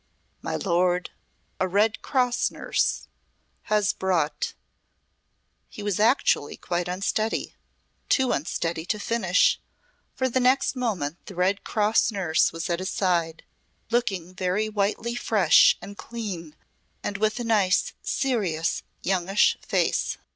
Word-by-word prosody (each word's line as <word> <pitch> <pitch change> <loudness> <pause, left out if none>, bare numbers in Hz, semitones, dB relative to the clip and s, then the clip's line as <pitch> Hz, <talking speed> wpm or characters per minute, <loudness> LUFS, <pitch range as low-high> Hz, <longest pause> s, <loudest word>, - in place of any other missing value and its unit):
"My - - -3
lord 180 -1 +1 0.5
a 185 - +1
Red 210 +4 +1
Cross 250 -2 +1
nurse - - -1 0.6
has 210 -1 +2
brought" 175 -5 -1 1.1
he 210 - -9
was 205 -2 -1
actually 220 - +2
quite 175 0 -2
unsteady 200 +4 -1 0.6
too 260 -2 +3
unsteady 165 +2 -2
to 210 - -1
finish, 205 -4 +2 0.5
for 260 - 0
the 260 +1 0
next 260 +2 +2
moment 185 - -2
the 195 - -9
Red 185 +3 +1
Cross 215 +1 +2
nurse 180 -6 +2
was 165 0 -4
at 170 -1 -1
his 185 - -3
side 170 -4 0 0.5
looking 195 -7 -1
very 185 +3 0
whitely 215 +3 -1
fresh 205 -8 +5
and 200 - -8
clean 190 -9 -6 0.5
and 200 - -3
with 215 +3 0
a - - -2
nice, 210 -5 +2
serious 195 - -1 0.2
youngish 190 +1 +2
face. - - 0
200 Hz, 125 wpm, -25 LUFS, 175-225 Hz, 1.1 s, fresh